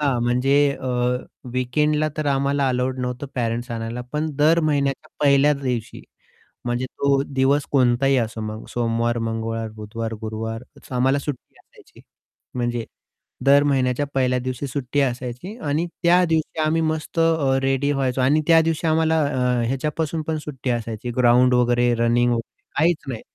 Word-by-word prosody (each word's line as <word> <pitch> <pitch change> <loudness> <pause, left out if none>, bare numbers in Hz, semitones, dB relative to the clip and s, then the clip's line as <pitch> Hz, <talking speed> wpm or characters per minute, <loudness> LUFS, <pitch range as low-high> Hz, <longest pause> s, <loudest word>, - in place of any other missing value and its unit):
हां, 135 -5 +1
म्हणजे 125 +3 +2 0.3
अ, - - -5 0.7
वीकेंडला 150 +5 +1
तर 155 -1 -2
आम्हाला 140 0 +1
अलाउड 130 +1 -1
नव्हतं 125 +2 -4
पॅरेंट्स 120 0 -2
आणायला. 115 +1 -4
पण 155 +1 -1
दर 160 +3 +4
महिन्याच्या 145 -1 0 0.2
पहिल्या 140 +1 +5
दिवशी 125 -4 -3 0.6
म्हणजे 120 +1 -1
तो 140 +1 +1
दिवस 140 +1 +1
कोणताही 135 0 +3
असो 115 -1 -2
मग 110 0 -6
सोमवार, 120 0 0
मंगळवार, 115 0 -3
बुधवार, 110 +1 -6
गुरुवार 110 +1 -4 0.3
आम्हाला 135 +3 +2
सुट्टी 140 -2 -7
असायची. - - -20 0.5
म्हणजे 120 -2 -2 0.6
दर 140 +1 +6
महिन्याच्या 135 -1 +1
पहिल्या 125 -1 +2
दिवशी 130 +2 -4
सुट्टी 135 +1 -2
असायची 125 - -3
आणि 155 +4 0 0.2
त्या 175 +1 +5
दिवशी 160 -1 -1
आम्ही 155 +1 +1
मस्त 160 +1 -2 0.4
रेडी 135 +2 +1
व्हायचो 135 -2 0
आणि 145 +5 +3
त्या 165 -1 +6
दिवशी 165 0 -1
आम्हाला 160 0 +2
अ, 125 -3 0
ह्याच्यापासून 150 +5 -2
पण 160 -1 -1
सुट्टी 135 -3 -5
असायची, 115 0 -3
ग्राउंड 125 +1 +5
वगैरे, 120 0 +3
रनिंग 120 +1 +2
वगैरे 115 -1 -6 0.2
काहीच 165 +1 +3
नाही. 120 -4 -5
130 Hz, 145 wpm, -22 LUFS, 120-145 Hz, 0.7 s, दर